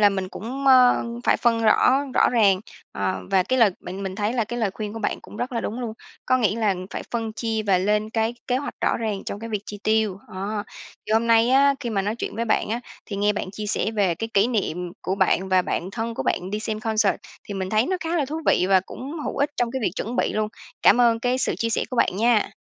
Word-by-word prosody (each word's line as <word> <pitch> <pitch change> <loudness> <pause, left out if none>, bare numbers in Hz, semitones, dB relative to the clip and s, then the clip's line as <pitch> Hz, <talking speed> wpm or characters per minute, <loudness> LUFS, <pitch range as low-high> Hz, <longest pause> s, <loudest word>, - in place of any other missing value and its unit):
là 205 - +7
mình 190 -2 -3
cũng, 260 +8 -6
ơ, 255 -3 +6 0.2
phải - - +4
phân 230 -1 +2
rõ 260 +5 +4
rõ - - +5
ràng. 200 -6 +4 0.3
Ờ, 95 -1 -2
và 190 -1 +4
cái 255 +7 0
lời 220 -4 +6
bạn 190 +2 -7
mình 190 -1 -4
thấy 210 +3 -1
là 235 -3 0
cái 240 +3 -5
lời 215 -4 +1
khuyên 210 -1 -5
của 225 - -6
bạn 220 - -2
cũng - - -12
rất 250 +3 -3
là 230 - -1
đúng 235 +4 -4
luôn. 230 -3 -3 0.3
Có 255 - +4
nghĩa 220 -2 +1
là, 220 -2 +1
ừm, 185 0 -3
phải - - -5
phân 225 -2 -2
chia 220 -1 -2
và 190 -2 +4
lên 210 +3 0
cái 225 +1 0
kế 250 - +1
hoạch 285 - -4
rõ - - +2
ràng 215 -4 -3
trong 200 - -5
cái 230 - -6
việc 210 -2 -2
chi 205 - -7
tiêu. 215 -3 +1
Đó, 205 +2 -4 0.4
thì 215 - -2
hôm 225 +1 +3
nay 230 +1 +4
á, 275 +1 +5
khi 240 - -3
mà 200 -3 0
nói 210 +3 -1
chuyện - - -4
với 230 - -1
bạn 220 - +1
á, 235 +2 -2 0.3
thì 200 - -5
nghe 205 +1 +2
bạn 195 -2 -4
chia 210 +1 -6
sẻ 215 - 0
về 200 -6 +1
cái 225 +7 -4
kỷ 200 +3 +5
niệm 180 -7 -2
của 185 - -1
bạn 190 -1 +1
và 185 -1 +4
bạn 180 +1 -3
thân 230 +2 -3
của - - -3
bạn 185 +1 -1
đi 210 +1 -2
xem 215 -1 -3
concert 220 -2 +1 0.3
thì 200 - -6
mình 190 -1 -3
thấy 220 +4 +2
nó 370 - 0
khá 330 +2 -1
là 295 - +2
thú 310 +4 -4
vị 180 - +4
và 190 -1 +5
cũng 260 +9 -8
hữu - - -4
ích 285 - +1
trong 240 -1 0
cái 265 0 -3
việc - - +1
chuẩn 235 +4 -3
bị - - +1
luôn. 215 0 0 0.3
Cảm 245 - +6
ơn 230 -1 +4
cái 250 +1 +1
sự 260 - 0
chia 230 - -1
sẻ - - +1
của 255 - -4
bạn 190 - +2
nha! 230 -1 +3
220 Hz, 275 wpm, -23 LUFS, 200-235 Hz, 0.4 s, là